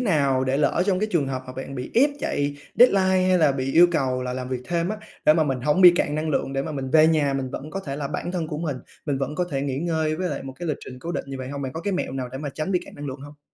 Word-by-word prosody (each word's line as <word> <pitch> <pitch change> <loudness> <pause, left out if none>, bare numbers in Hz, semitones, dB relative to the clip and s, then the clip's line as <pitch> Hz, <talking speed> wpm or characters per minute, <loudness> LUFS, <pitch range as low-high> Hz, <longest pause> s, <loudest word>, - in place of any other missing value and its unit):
nào 140 - +2
để 130 +1 +1
lỡ 150 +4 +2
trong 190 -2 +2
cái 215 - 0
trường 150 -6 +2
hợp 130 -1 -3
mà 130 - -7
bạn 135 +1 -7
bị 125 -1 -5
ép 280 +5 +5
chạy 145 0 -1 0.2
deadline, 190 -5 +5
hay 185 - +4
là 155 -4 +4
bị 135 0 -2
yêu 175 +2 +8
cầu 130 -5 0
là 125 0 -3
làm 130 0 -4
việc 130 -1 -3
thêm 170 0 0
á, 215 - -2 0.3
để 155 - +7
mà 160 - +3
mình 135 -4 -1
hổng 150 +7 +2
bị 180 -2 +10
cạn 145 - 0
năng 155 +1 -1
lượng, 135 -2 -1
để 135 0 -1
mà - - -5
mình 135 -2 -4
về 155 0 +6
nhà 150 -4 +2
mình 130 -1 -2
vẫn 150 +4 -6
có 195 - -4
thể 140 -7 -5
là 140 -2 -3
bản 175 +4 -4
thân 170 -3 -2
của 150 - -4
mình, 155 -5 -2 0.3
mình 140 -2 0
vẫn 135 +2 -2
có 180 - 0
thể 135 -1 -1
nghỉ 135 -1 -2
ngơi 160 -2 0
với 180 +1 -1
lại - - -4
một 135 - -7
cái 175 -1 -4
lịch 150 - -1
trình 125 0 -9
cố 170 +6 -5
định - - -3
như 135 - -5
vậy 130 0 -5
hông? 140 0 -5
Bạn 130 - -4
có 160 - -5
cái 200 +2 -2
mẹo 180 - -2
nào 130 -2 -3
để 130 - -5
mà 145 0 -4
tránh 155 +5 -2
bị 180 - +2
cạn - - -13
năng 145 0 -7
lượng 135 0 -6
hông? 145 +1 -12
145 Hz, 330 wpm, -24 LUFS, 135-170 Hz, 0.3 s, bị